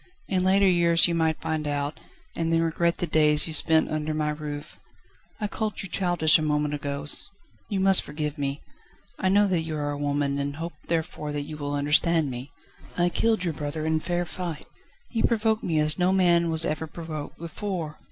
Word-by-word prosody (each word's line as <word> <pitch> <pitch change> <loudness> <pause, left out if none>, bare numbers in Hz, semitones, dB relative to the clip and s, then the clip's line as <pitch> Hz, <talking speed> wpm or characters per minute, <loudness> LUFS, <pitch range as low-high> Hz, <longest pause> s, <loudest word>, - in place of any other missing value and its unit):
In 185 -2 0
later 195 +1 +4
years 170 -2 +4
you 170 - -1
might 160 -1 +1
find 155 -1 -2
out, 145 +1 -2 0.4
and 165 0 -1
then 165 0 +3
regret 170 +1 0
the - - -1
days 150 -2 +5
you 160 - -5
spent 160 0 +4
under 155 0 -2
my 150 0 0
roof. 150 -1 -7 0.6
I 210 - -1
called 215 0 -4
you - - -6
childish 175 -4 +3
a - - -2
moment 150 -1 0
ago, 140 -1 -4 0.6
you 200 - -1
must 190 0 +7
forgive 150 0 -5
me; 140 0 -3 0.6
I 190 - +1
know 205 +2 +4
that 180 -4 +1
you 160 -1 -4
are 145 0 -2
a 145 - -5
woman, 145 -1 0
and 140 0 -3
hope 165 +3 -5
therefore 160 -2 -2
that 145 -1 -2
you 155 +1 -8
will 145 -1 -4
understand 150 +1 +2
me. 125 +3 -7 0.5
I 175 0 +3
killed 220 +1 +1
your 170 -3 -1
brother 150 +1 -4
in 160 0 +1
fair 175 +2 -2
fight. 170 -4 -6 0.4
He 225 - -2
provoked 220 -1 +1
me 165 -3 -1
as 155 +3 0
no 180 +1 +3
man 175 -3 +3
was 160 0 +3
ever 155 +1 -2
provoked 155 -2 -7
before 170 -2 -5
160 Hz, 200 wpm, -26 LUFS, 150-175 Hz, 0.6 s, must